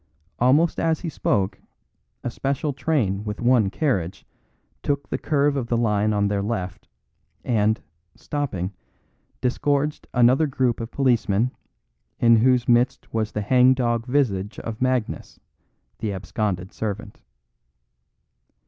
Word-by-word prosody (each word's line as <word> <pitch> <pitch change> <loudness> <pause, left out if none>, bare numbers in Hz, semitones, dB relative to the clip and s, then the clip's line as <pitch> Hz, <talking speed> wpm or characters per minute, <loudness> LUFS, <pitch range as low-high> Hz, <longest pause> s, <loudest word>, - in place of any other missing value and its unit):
Almost 145 +7 +3
as 160 -1 +1
he 170 - -3
spoke 100 -9 -1 0.6
a 120 - -2
special 140 +3 -2
train 125 -8 0
with 105 -1 -5
one 120 -4 +3
carriage 95 - -1 0.6
took 140 -1 -1
the - - -3
curve 145 -1 +1
of 130 -4 -2
the 120 - +1
line 105 -2 +2
on 100 -1 +1
their 100 -1 0
left, 100 -4 -4 0.6
and, 110 -2 +2 0.4
stopping, 105 -11 -3 0.7
disgorged 145 +4 0
another 125 +5 +4
group 130 -3 0
of 115 -1 -5
policemen, 120 -4 +1 0.7
in 115 -1 +6
whose 125 +1 +3
midst 120 +1 +2
was 110 -1 -1
the 105 - -2
hangdog 125 0 +3
visage 115 -7 0
of 115 0 -6
Magnus, 130 -3 -1 0.6
the 110 -2 -2
absconded 95 0 -3
servant. 105 0 -5
120 Hz, 120 wpm, -23 LUFS, 105-130 Hz, 0.7 s, in